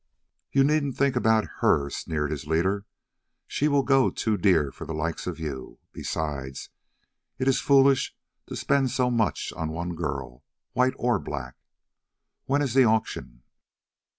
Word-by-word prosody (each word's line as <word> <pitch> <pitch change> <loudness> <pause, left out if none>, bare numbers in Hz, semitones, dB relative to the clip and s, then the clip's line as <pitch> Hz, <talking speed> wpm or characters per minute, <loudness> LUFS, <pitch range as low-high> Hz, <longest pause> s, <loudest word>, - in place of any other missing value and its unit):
"You 135 - +4
needn't 145 -2 +1
think 140 -1 +2
about 110 -3 +3
her," 70 - +3
sneered 75 -2 -2
his 75 -1 -5
leader; 95 +6 0 0.6
"she 150 - 0
will 140 -2 +3
go 135 -1 +4
too 110 -2 -1
dear 85 -8 +3
for - - -9
the 80 - -4
likes 80 +2 -3
of 85 -2 -4
you; 70 -5 -6
besides 70 -4 -4 0.7
it 130 - -1
is 135 -1 +3
foolish 135 -1 +4 0.3
to - - -6
spend 140 -2 +1
so 125 0 +1
much 115 -4 0
on 80 -1 -3
one 85 +2 -4
girl, 70 -6 -5 0.3
white 130 +1 +2
or 120 0 +1
black. - - -6 0.9
When 145 +2 +1
is 130 -5 -1
the 135 0 +6
auction?" 110 - -1
105 Hz, 150 wpm, -26 LUFS, -, 0.9 s, the